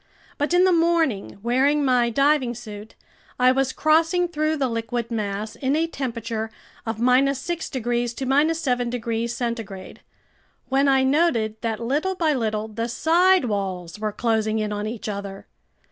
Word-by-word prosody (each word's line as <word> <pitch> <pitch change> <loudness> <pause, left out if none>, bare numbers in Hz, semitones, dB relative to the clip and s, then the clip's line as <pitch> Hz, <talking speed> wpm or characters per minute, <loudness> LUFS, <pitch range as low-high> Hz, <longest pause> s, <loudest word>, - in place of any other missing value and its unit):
But 290 +2 0
in 355 +1 +5
the 375 - +4
morning, 330 - +1
wearing 275 +5 +2
my 250 -2 +3
diving 275 0 +2
suit, 215 -2 -10 0.4
I 255 0 +5
was 265 0 +1
crossing 325 +5 +2
through 310 -1 -1
the 270 -2 +1
liquid 230 0 -3
mass 210 -1 -3
in 275 0 0
a 320 +1 +2
temperature 230 -7 -4 0.4
of 225 - -1
6 270 +7 +1
degrees 240 -2 -2
to 280 +4 +2
7 250 -6 -1
degrees 235 -1 -2
centigrade, 225 -6 -5 0.7
when 270 +2 +3
I 270 -1 +4
noted 260 -7 +1
that 225 -2 -2
little 295 +11 -1
by 320 -4 +1
little 220 -4 -1
the 230 +2 -4
side 350 +5 +3
walls 195 -4 -3
were 215 0 -2
closing 220 0 0
in 210 -1 -1
on 210 +1 -3
each 220 0 -6
other. 200 -1 -6
245 Hz, 155 wpm, -23 LUFS, 220-290 Hz, 0.7 s, in